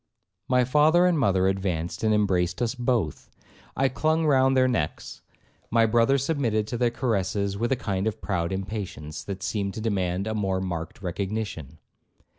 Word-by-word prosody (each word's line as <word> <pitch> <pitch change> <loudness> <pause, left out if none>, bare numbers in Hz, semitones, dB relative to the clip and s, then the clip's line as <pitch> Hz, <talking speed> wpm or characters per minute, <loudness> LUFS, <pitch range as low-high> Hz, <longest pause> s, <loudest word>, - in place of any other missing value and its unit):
'My 125 -1 +3
father 155 +7 +4
and 175 -3 +3
mother 95 -7 +3
advanced 95 -3 -2
and 110 - +3
embraced 95 -4 +1
us 120 -1 0
both. 120 - -1 0.5
I 135 - +3
clung 155 +4 +1
round 135 -2 +4
their 130 0 +5
necks; 85 -12 -3 0.5
my 115 0 +4
brother 115 +4 +3
submitted 130 -7 0
to 120 - -3
their 120 -1 +3
caresses 100 -4 -1
with 120 +5 -1
a - - +4
kind 100 -4 -2
of 110 - -3
proud 85 0 -2
impatience, 95 -6 -5
that 100 -1 -6
seemed 100 -2 -2
to - - -4
demand 95 -3 -1
a 110 - -2
more 95 -3 0
marked 90 0 -5
recognition. 95 -5 -4
105 Hz, 165 wpm, -26 LUFS, 95-125 Hz, 0.5 s, their